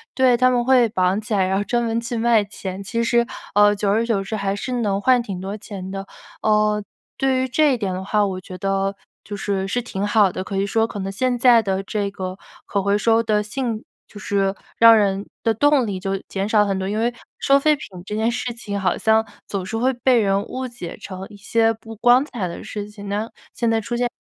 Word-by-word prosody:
对， 260 -2 +4
他 255 +1 +4
们 245 -1 +1
会 250 -2 +5
绑 185 -1 +1
起， 215 +1 -5
来 190 -2 +2
然 190 +1 +1
后 205 - 0
专 240 +3 0
门 230 0 0
去 235 0 -4
卖 225 -2 +3
钱。 195 -1 -7
其 230 +4 -1
实， 235 0 +3 0.3
呃， 205 0 +6
久 205 0 -1
而 220 +3 +2
久 220 -4 0
之 205 +3 -4
还 200 -1 -1
是 230 +5 -5
能 200 -2 0
换 250 +3 +4
挺 195 -6 -6
多 195 +2 -4
钱 195 -3 -8
的。 195 0 -5 0.4
呃， 210 -1 +2 0.3
对 265 -1 +1
于 260 - 0
这 295 +2 +3
一 - - 0
点 195 -5 -2
的 185 - -4
话， 210 +1 +2
我 190 -2 -3
觉 185 0 -9
得 195 +1 -1 0.3
就 205 - -6
是 195 -1 -2
是 245 +5 -1
挺 205 -4 -4
好 205 -3 +4
的， 185 - -4
可 195 0 -4
以 195 - +1
说 225 +3 +1
可 205 - -7
能 195 0 -3
现 245 +5 0
在 240 -1 +6
的 195 -2 -1
这 200 0 -2
个 185 -1 -5 0.3
可 200 - -1
回 200 +1 +2
收 225 +2 +3
的 215 -2 +1
性 230 0 -3 0.2
就 205 - -12
是 195 -2 0 0.2
让 230 0 +8
人 200 -1 +1 0.2
的 225 - +2
动 290 +2 +3
力 190 -2 -3
就 195 0 -2
减 195 0 -2
少 210 -1 +4
很 195 -1 -1
多。 190 - -2
因 210 +2 -1
为 240 +1 +1 0.3
收 275 0 +4
废 305 +2 +3
品 280 - -9 0.2
这 210 - -4
件 220 +2 +1
事 245 0 -3
情， 210 -3 -5
好 185 -2 0
像 220 0 +3 0.2
总 195 -2 -3
是 225 +4 -3
会 255 +3 +2
被 245 0 +3
人 195 -2 +2
误 260 +1 -4
解 235 -9 -8
成 190 -1 -8
一 205 - -13
些 225 +2 +2
不 225 0 -11
光 245 +4 +5
彩 235 -10 -4
的 170 - -7
事 205 -1 -6
情， 205 -1 -10
那 210 +3 -2 0.2
现 235 - 0
在 225 0 +2
出 235 +3 -4
现 245 0 0
210 Hz, 260 characters per minute, -21 LUFS, 195-235 Hz, 0.4 s, 让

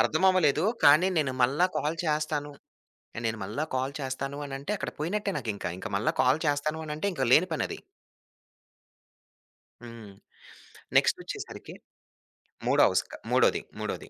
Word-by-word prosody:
అర్థం 155 - +2
అవ్వలేదు 160 -4 +3 0.2
కానీ 155 +6 +7
నేను 140 -4 0
మళ్ళా 140 +9 +3
కాల్ 155 +3 -1
చేస్తాను, 150 -1 -1 0.7
నేను 110 0 -2
మళ్ళా 150 +10 -3
కాల్ 130 +2 -2
చేస్తాను 135 +1 -4
అనంటే 140 +9 -4
అక్కడ - - -4
పోయినట్టే 200 +6 -1
నాకింక. 110 -8 -4
ఇంకా 95 - -6
మళ్ళా 105 - +1
కాల్ 130 +5 +3
చేస్తాను 150 +2 0
అనంటే 155 +6 -2
ఇంకా 135 -5 0
లేని 175 +7 +6
పనది. - - -3 2.0
హ్మ్. 115 -4 -11 0.8
నెక్స్టోచ్చేసరికి - - -1 0.9
మూడో - - +4
అవస్క - - -1 0.2
మూడోది, - - +3 0.2
మూడోది. - - -5
145 Hz, 125 wpm, -28 LUFS, 130-155 Hz, 2.0 s, కానీ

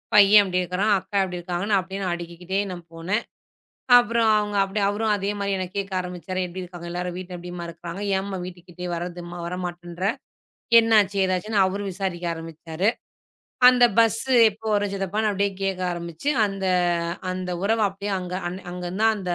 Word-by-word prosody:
பையன் 205 0 +8
எப்படி 185 -1 0
இருக்கறான்? 185 +4 0
அக்கா 195 +2 -4
எப்படி 180 -1 -4
இருக்காங்க? 180 +4 -2
அப்டியே 190 +2 -5
அடிக்கிக்கிட்டே 175 +3 -4
நான் 175 -1 -7
போனேன். 185 +7 -1 0.8
அப்றம் 235 -2 +2
அவங்க 210 -1 -2
அப்டியே 200 +1 -1
அவரும் 210 +1 +1
அதே 200 +1 -2
மாரி 200 0 -1
என்னக் 185 +1 -5
கேக்க 195 -1 -3
ஆரம்பிச்சாரு. 180 +1 -4
எப்படி 185 +1 -7
இருக்காங்க 175 -1 -9
எல்லாரும்? 180 0 -3
வீட்ல 180 -1 -6
எப்டிம்மா 175 0 -7
இருக்கறாங்க? 170 +3 -7 0.2
ஏன்ம்மா 195 -1 -4
வீட்டுக்கு 180 -1 -10
கிட்டயே 180 +1 -6
வர்றதும்மா 175 0 -6
வர 180 +1 -4
மாட்டேன்ற? 175 +1 -4 0.7
என்னாச்சு, 210 -3 +3
ஏதாச்சுன்னு, 190 +3 +1
அவரு 200 +2 -3
விசாரிக்க 180 -2 -3
ஆரம்பிச்சாரு. 165 +3 -3 0.8
அந்த 250 -1 +6
பஸ் 225 -1 +4 0.3
எப்போ 220 +2 -12
வரும் 205 -1 0
சித்தப்பான்னு 205 +3 0
அப்டியே 200 0 +1
கேக்க 195 -1 -1
ஆரம்பிச்சு, 170 - -5 0.2
அந்த 195 -1 -5 0.7
அந்த 185 0 -4
உறவ 225 +2 +2
அப்டியே 200 +1 -5
அங்க 180 0 -5
அன் 185 +2 -7
அங்கருந்து 180 +3 -4
தான் 220 -1 +4
அந்த 180 -3 -2
185 Hz, 165 wpm, -24 LUFS, 175-205 Hz, 0.8 s, பையன்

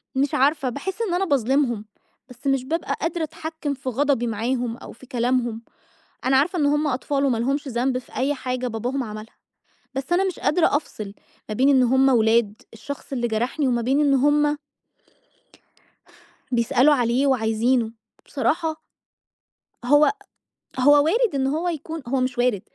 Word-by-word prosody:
مش 275 +1 +1
عارفة، 275 0 +2
باحس 370 - -5
إن 420 -6 -1
أنا 370 +2 +1
باظلمهم، 265 - +1 0.4
بس 250 +3 -9
مش 270 -2 +2
بابقى 325 +4 -2
قادرة 330 0 -1
أتحكم 315 -1 -4
في 265 -1 -5
غضبي 265 -1 +1
معاهم 235 +2 -2
أو - - -11
في 260 - -15
كلامهم، 240 -2 -1 0.6
أنا 265 +1 +3
عارفة 340 +6 +2
إن 295 - +2
هُم 295 +1 +2
أطفال 275 +1 -1
وما 250 -4 +1
لهمش 275 +4 -1
ذنب 250 +1 0
في 255 - -13
أي 275 +3 +1
حاجة 255 -2 -3
باباهم 245 +4 -2
عملها، 215 0 -9 0.6
بس 270 +5 -4
أنا 375 +2 +3
مش 375 -3 -3
قادرة 315 -2 +2
أفصل 215 -9 -6 0.3
ما 215 - -3
بين 260 +6 +3
إن 265 -2 +5
هُم 265 +2 +4
ولاد 225 -3 +2
الشخص 275 +5 -8
اللي 240 -2 -1
جرحني، 245 +6 -1
وما 240 -1 0
بين 265 +5 +2
إن 285 -2 +3
هُم 295 +2 +3 2.0
بيسألوا 250 +4 +3
عليه 245 +1 +1
وعايزينه. 230 -1 +1 0.3
بصراحة 310 +4 -1 1.1
هو 290 +6 +5 0.7
هو 290 +2 +6
وارد 440 0 +2
إن 265 -1 +1
هو 320 +6 -1
يكون 320 -1 -5
هو 265 +2 0
مش 255 -1 -2
وارد، 245 -6 +1
265 Hz, 160 wpm, -23 LUFS, 240-290 Hz, 2.0 s, هو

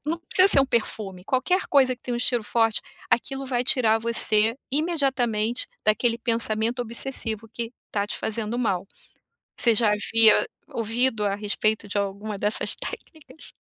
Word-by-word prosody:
não 330 +2 -1
precisa 375 +1 +5
ser 275 - +7
um 270 - +2
perfume, 200 -5 -2
qualquer 360 - 0
coisa 260 -3 +3
que - - -45
tem 245 - -4
um - - -2
estilo 240 -2 +1
forte, 225 -1 +3 0.3
aquilo 270 +3 -1
vai 245 -1 -1
tirar 225 -4 +3
você 225 0 +2 0.2
imediatamente 265 -8 0 0.2
daquele 230 +2 +2
pensamento 230 0 0
obsessivo 230 -2 -2
que 230 -1 -4 0.2
tá 205 -1 -1
te - - -5
fazendo 220 +2 -3
mal. 195 -6 -1 0.7
Você 235 -2 +3
já 220 0 +2
havia 220 +1 +4 0.2
ouvido 230 0 -1
a 200 - 0
respeito 210 +1 -1
de 205 - -2
alguma 200 +1 -4
dessas 210 +2 +2
técnicas? 315 0 -8
230 Hz, 155 wpm, -24 LUFS, 215-255 Hz, 0.7 s, ser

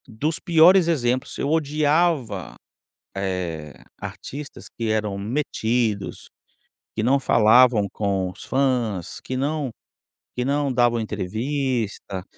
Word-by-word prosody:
Dos 145 +7 -2
piores 170 +2 +6
exemplos, 130 -5 0
eu - - -1
odiava, 150 - +1 0.6
eh, 90 -6 -3 0.3
artistas 140 +1 -8
que 115 -1 -4
eram 105 -2 -1
metidos, 110 -2 -2 0.7
que 110 - -2
não 130 +5 +3
falavam 120 -3 +5
com 95 -3 -1
os 90 - -11
fãs, 125 -9 -1
que 130 - -5
não 145 0 -1 0.7
que 125 - 0
não 140 0 0
davam 120 -2 +2
entrevista, 110 -2 -3
120 Hz, 105 wpm, -23 LUFS, 105-140 Hz, 0.7 s, piores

